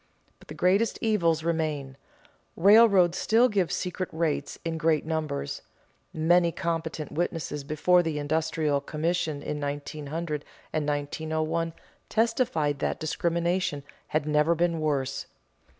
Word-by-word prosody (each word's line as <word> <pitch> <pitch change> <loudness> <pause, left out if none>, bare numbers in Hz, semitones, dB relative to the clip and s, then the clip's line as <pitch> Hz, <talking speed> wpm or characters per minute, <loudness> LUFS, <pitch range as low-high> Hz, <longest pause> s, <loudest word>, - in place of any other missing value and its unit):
But - - -19
the 150 - -8
greatest 190 +7 +2
evils 170 -8 +1
remain. 155 -5 -2 0.6
Railroads 195 -2 +6
still 230 +3 +4
give 195 -8 0
secret 180 0 -3
rates 160 -2 -1
in 165 -1 -2
great 160 -2 +2
numbers; 155 - -3 0.5
many 170 +2 +3
competent 165 -2 -3
witnesses 160 -3 -2
before 160 +5 +3
the 160 -3 -2
Industrial 150 -1 0
Commission 155 0 -2
in 150 0 -4
1900 150 +2 -4 0.3
and 155 -2 -1
1901 155 +3 -2 0.4
testified 215 - +1
that - - -1
discrimination 170 -1 -1 0.2
had 155 -1 0
never 150 +2 +3
been 170 0 +1
worse. 140 -3 -1
160 Hz, 120 wpm, -27 LUFS, 150-175 Hz, 0.6 s, Railroads